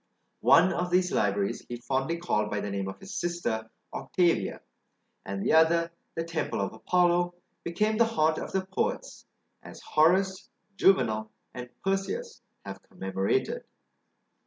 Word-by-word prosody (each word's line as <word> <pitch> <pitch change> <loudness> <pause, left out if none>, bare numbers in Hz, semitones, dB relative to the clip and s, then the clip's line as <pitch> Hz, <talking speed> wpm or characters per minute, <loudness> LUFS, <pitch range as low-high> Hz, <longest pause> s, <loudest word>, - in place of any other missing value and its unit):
One 185 - +5
of 180 +1 -1
these 180 0 +2
libraries 100 -1 0
he 120 - -3
fondly 135 +6 -1
called 105 -12 0
by 105 - -2
the 100 - -4
name 100 -1 -2
of 95 - -7
his 195 +1 -9
sister 120 -11 -2 0.2
Octavia; 175 -2 0 0.7
and 100 0 -3
the - - +2
other, 165 +1 +4 0.2
the 165 - -1
temple 165 -1 -3
of - - -2
Apollo, 175 0 +2 0.3
became 210 +6 0
the 230 - +6
haunt 160 -9 +1
of - - -6
the 190 -1 -1
poets, 190 - -3 0.3
as - - -11
Horace, 185 +5 +2 0.3
Juvenal, 110 - +3 0.2
and 125 0 -7
Persius 195 - -2 0.2
have - - -7
commemorated. 95 0 -2
170 Hz, 140 wpm, -28 LUFS, -, 0.7 s, the